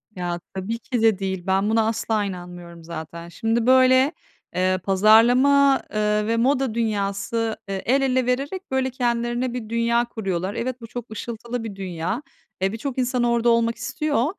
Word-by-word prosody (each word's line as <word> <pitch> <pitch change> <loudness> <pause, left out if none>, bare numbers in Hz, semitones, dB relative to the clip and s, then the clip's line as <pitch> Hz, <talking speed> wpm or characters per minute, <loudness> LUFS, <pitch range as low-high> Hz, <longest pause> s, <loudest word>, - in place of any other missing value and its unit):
Ya, 175 -1 -3
tabii 195 +5 -3
ki 240 0 -3
de 220 -4 +3
değil. 190 -2 -3
Ben 195 +2 +2
buna 220 0 +2
asla 220 -1 0
inanmıyorum 175 -2 -8
zaten. 170 +1 -8
Şimdi, 225 +5 -1
böyle, 260 +2 +5 0.4
eee, 185 0 +2
pazarlama, 245 +8 +5
eee, 210 0 +1
ve 230 0 +1
moda 260 -1 +1
dünyası, 220 0 -1
eee, 195 -1 -3
el 270 +3 +3
ele 260 -2 +1
vererek 280 +8 -2
böyle 265 0 +1
kendilerine 240 0 -1
bir 225 -3 -5
dünya 235 +1 +1
kuruyorlar. 195 -4 -3
Evet, 255 0 -4
bu 230 - -8
çok 240 -1 -8
ışıltılı 235 +1 -5
bir 210 -3 -6
dünya. 185 - -3 0.4
Eee, 195 +1 +1
birçok 250 +4 -5
insan 250 -1 0
orada 235 0 +2
olmak 230 0 +2
istiyor 295 -5 -1
230 Hz, 165 wpm, -23 LUFS, 195-250 Hz, 0.4 s, böyle